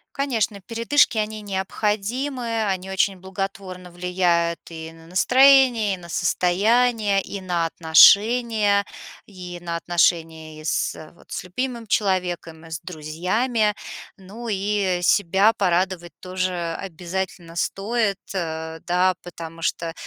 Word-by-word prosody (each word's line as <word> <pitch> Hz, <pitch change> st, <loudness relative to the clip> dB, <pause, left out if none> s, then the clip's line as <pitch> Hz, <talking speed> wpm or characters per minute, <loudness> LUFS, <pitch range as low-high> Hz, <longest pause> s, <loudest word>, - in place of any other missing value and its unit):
Конечно, 230 Hz, -7 st, -1 dB
передышки- 230 Hz, +5 st, +2 dB
они 215 Hz, 0 st, -2 dB
необходимы, 220 Hz, +5 st, -2 dB
они 190 Hz, -1 st, -2 dB
очень 190 Hz, 0 st, +1 dB
благотворно 190 Hz, -1 st, -6 dB
влияют 175 Hz, -1 st, 0 dB
и 160 Hz, -1 st, -8 dB
на 165 Hz, 0 st, -16 dB
настроение, 250 Hz, +2 st, +5 dB
и -, -, -4 dB
на 170 Hz, -1 st, -13 dB
состояние, 205 Hz, +5 st, +2 dB
и 200 Hz, -, -7 dB
на 175 Hz, -3 st, -1 dB
отношения, 205 Hz, +5 st, +5 dB, 0.4 s
и 180 Hz, -3 st, -9 dB
на 170 Hz, -1 st, -4 dB
отношения 165 Hz, -2 st, 0 dB
и -, -, -13 dB
с 155 Hz, 0 st, -2 dB
вот, -, -, -21 dB
с -, -, -4 dB
любимым 235 Hz, +5 st, -4 dB
человеком, 180 Hz, -5 st, -1 dB
и 165 Hz, -, -13 dB
с 160 Hz, -, -4 dB
друзьями. 185 Hz, +8 st, -1 dB, 0.4 s
Ну 205 Hz, +5 st, -10 dB
и 200 Hz, -2 st, 0 dB
себя 200 Hz, +4 st, +4 dB
порадовать 180 Hz, -2 st, 0 dB
тоже 185 Hz, -2 st, -3 dB
обязательно 180 Hz, -1 st, -5 dB
стоит, 205 Hz, +3 st, -1 dB, 0.2 s
э, 160 Hz, -3 st, -4 dB
да, 180 Hz, +1 st, +2 dB
потому 165 Hz, -1 st, -9 dB
что, 165 Hz, 0 st, -2 dB
190 Hz, 120 wpm, -23 LUFS, 170-210 Hz, 0.4 s, настроение